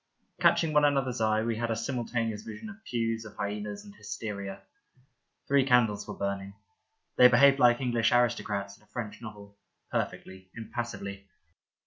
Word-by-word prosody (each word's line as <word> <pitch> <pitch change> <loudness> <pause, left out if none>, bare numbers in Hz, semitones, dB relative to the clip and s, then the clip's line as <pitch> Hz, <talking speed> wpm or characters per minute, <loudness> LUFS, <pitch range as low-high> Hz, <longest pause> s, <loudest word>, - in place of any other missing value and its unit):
Catching 160 -2 +3
one 150 0 +5
another's 135 -5 +1
eye, 110 0 +2
we 115 -1 -1
had 115 +1 -2
a 115 - 0
simultaneous 115 -2 -2
vision 110 - -8
of 220 +1 -15
pews, 115 -1 -1
of 110 - -11
hyenas 105 0 -4
and 100 - -12
hysteria. 100 -2 -6 0.8
Three 140 -1 +4
candles 115 -5 +3
were - - -6
burning. 100 0 -3 0.6
They 125 - +10
behaved 135 +3 +6
like 120 -2 +5
English 120 -3 +2
aristo 120 -1 +3
crats 100 -1 -4
in - - -27
a - - -26
French 110 -3 -6
novel 100 -2 -11
— - - -45
perfectly, 95 0 -4
impassively. 105 -4 -6
115 Hz, 160 wpm, -29 LUFS, 100-120 Hz, 0.8 s, They